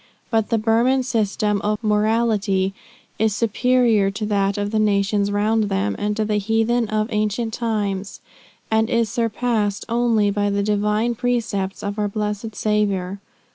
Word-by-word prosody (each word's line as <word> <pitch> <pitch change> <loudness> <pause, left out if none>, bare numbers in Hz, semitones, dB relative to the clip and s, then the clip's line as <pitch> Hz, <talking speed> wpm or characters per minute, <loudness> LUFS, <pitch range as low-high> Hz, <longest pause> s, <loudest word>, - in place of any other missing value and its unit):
But 225 -2 +1
the 230 - +2
Burman 235 +4 +2
system 210 -3 0
of 210 +2 -2
morality 210 -3 +1 0.5
is 220 -1 +2
superior 230 -2 +2
to 205 +2 -4
that 200 -1 0
of 205 0 -2
the 220 - +1
nations 205 -1 +1
round 215 +2 +1
them, 100 - -1
and 210 0 -1
to 215 - +1
the 210 0 0
heathen 225 +3 +1
of 215 0 0
ancient 215 +1 -1
times, 205 -4 -2 0.5
and 220 0 +2
is 230 -2 +1
surpassed 225 -3 -1
only 230 -3 +2
by 205 0 0
the 200 0 0
divine 210 +3 +1
precepts 230 -5 -2
of 205 +1 -3
our 210 - +1
blessed 210 +1 -4
Saviour. 200 -3 0
210 Hz, 150 wpm, -21 LUFS, 205-225 Hz, 0.5 s, the